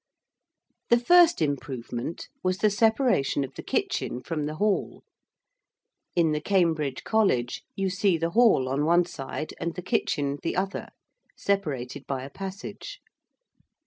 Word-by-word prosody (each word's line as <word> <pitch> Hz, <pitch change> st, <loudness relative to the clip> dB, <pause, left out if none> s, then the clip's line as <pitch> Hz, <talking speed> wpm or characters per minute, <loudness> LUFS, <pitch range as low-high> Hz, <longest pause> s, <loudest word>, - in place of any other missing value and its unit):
The 235 Hz, -, +6 dB
first 340 Hz, -, +5 dB
improvement 135 Hz, -1 st, -4 dB, 0.2 s
was 185 Hz, 0 st, +1 dB
the 215 Hz, +1 st, +3 dB
separation 220 Hz, -, +2 dB
of 135 Hz, 0 st, -7 dB
the -, -, -7 dB
kitchen 125 Hz, -, -2 dB
from 155 Hz, -3 st, -2 dB
the 155 Hz, -, -4 dB
hall: 205 Hz, +4 st, -1 dB, 1.1 s
in 165 Hz, -3 st, +3 dB
the 150 Hz, 0 st, -1 dB
Cambridge 160 Hz, -7 st, +1 dB
College 190 Hz, -, +1 dB
you 195 Hz, -1 st, -1 dB
see 185 Hz, -1 st, +2 dB
the 165 Hz, +1 st, -1 dB
hall 220 Hz, -, +4 dB
on 135 Hz, +3 st, 0 dB
one 170 Hz, +3 st, +4 dB
side 155 Hz, -1 st, -6 dB
and 170 Hz, 0 st, -3 dB
the 180 Hz, -, -6 dB
kitchen 145 Hz, -5 st, 0 dB
the -, -, -2 dB
other, 195 Hz, +1 st, -2 dB, 0.5 s
separated 150 Hz, -11 st, -2 dB
by 135 Hz, -2 st, -3 dB
a 135 Hz, -, -8 dB
passage. 195 Hz, -, -7 dB
170 Hz, 140 wpm, -26 LUFS, 140-200 Hz, 1.1 s, The